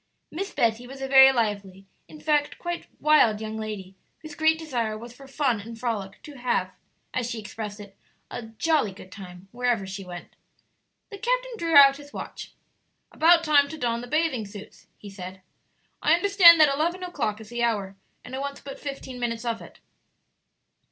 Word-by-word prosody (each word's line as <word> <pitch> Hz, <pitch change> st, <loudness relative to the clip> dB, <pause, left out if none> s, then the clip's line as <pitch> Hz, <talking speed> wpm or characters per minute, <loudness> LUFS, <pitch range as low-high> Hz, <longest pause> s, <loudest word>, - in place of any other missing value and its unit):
Miss 390 Hz, +5 st, -4 dB
Betty 230 Hz, +1 st, 0 dB
was 270 Hz, +1 st, -10 dB
a 270 Hz, -, -3 dB
very 265 Hz, 0 st, +8 dB
lively, 200 Hz, -5 st, -2 dB, 0.2 s
in 310 Hz, -, -13 dB
fact, 295 Hz, -2 st, 0 dB
quite 345 Hz, 0 st, -5 dB
wild, 295 Hz, -9 st, +4 dB
young 220 Hz, 0 st, -5 dB
lady, 210 Hz, -4 st, -6 dB, 0.3 s
whose 310 Hz, -, -9 dB
great 315 Hz, 0 st, +2 dB
desire 240 Hz, -9 st, -3 dB
was 235 Hz, +2 st, -10 dB
for 275 Hz, +2 st, -14 dB
fun 265 Hz, -6 st, 0 dB
and 230 Hz, +2 st, -10 dB
frolic; 215 Hz, -5 st, -4 dB
to 295 Hz, -3 st, -11 dB
have, 245 Hz, -1 st, 0 dB, 0.4 s
as 245 Hz, -2 st, -2 dB
she 230 Hz, -, -4 dB
expressed 210 Hz, 0 st, -7 dB
it, 200 Hz, -1 st, -12 dB, 0.4 s
"a 230 Hz, -, -6 dB
jolly 225 Hz, -1 st, 0 dB
good 185 Hz, -1 st, -14 dB
time" 185 Hz, -1 st, -11 dB
wherever 240 Hz, -4 st, 0 dB
she 195 Hz, +1 st, -7 dB
went. 175 Hz, -1 st, -10 dB, 0.8 s
The 405 Hz, -, -8 dB
captain -, -, 0 dB
drew 335 Hz, -6 st, -1 dB
out 275 Hz, -1 st, +9 dB
his 290 Hz, 0 st, -14 dB
watch. -, -, -8 dB, 0.6 s
"About 335 Hz, +1 st, +5 dB
time 290 Hz, -3 st, +4 dB
to 315 Hz, -, -7 dB
don 235 Hz, -4 st, -1 dB
the 245 Hz, -, -8 dB
bathing 300 Hz, -7 st, 0 dB
suits," 200 Hz, 0 st, -12 dB
he 205 Hz, -, -11 dB
said; 185 Hz, -1 st, -9 dB, 0.6 s
"I 315 Hz, -, +5 dB
understand 345 Hz, -2 st, +7 dB
that 300 Hz, -3 st, +6 dB
eleven 340 Hz, +6 st, -1 dB
o'clock 225 Hz, -12 st, -3 dB
is 220 Hz, -1 st, -12 dB
the 240 Hz, 0 st, -4 dB
hour, 205 Hz, -5 st, -1 dB, 0.3 s
and 250 Hz, -, -10 dB
it 265 Hz, -, -3 dB
wants 280 Hz, 0 st, -5 dB
but 275 Hz, -1 st, -9 dB
fifteen 275 Hz, -3 st, -7 dB
minutes 235 Hz, -1 st, -3 dB
of 230 Hz, -1 st, -2 dB
it." -, -, -13 dB
245 Hz, 185 wpm, -25 LUFS, 215-305 Hz, 0.8 s, out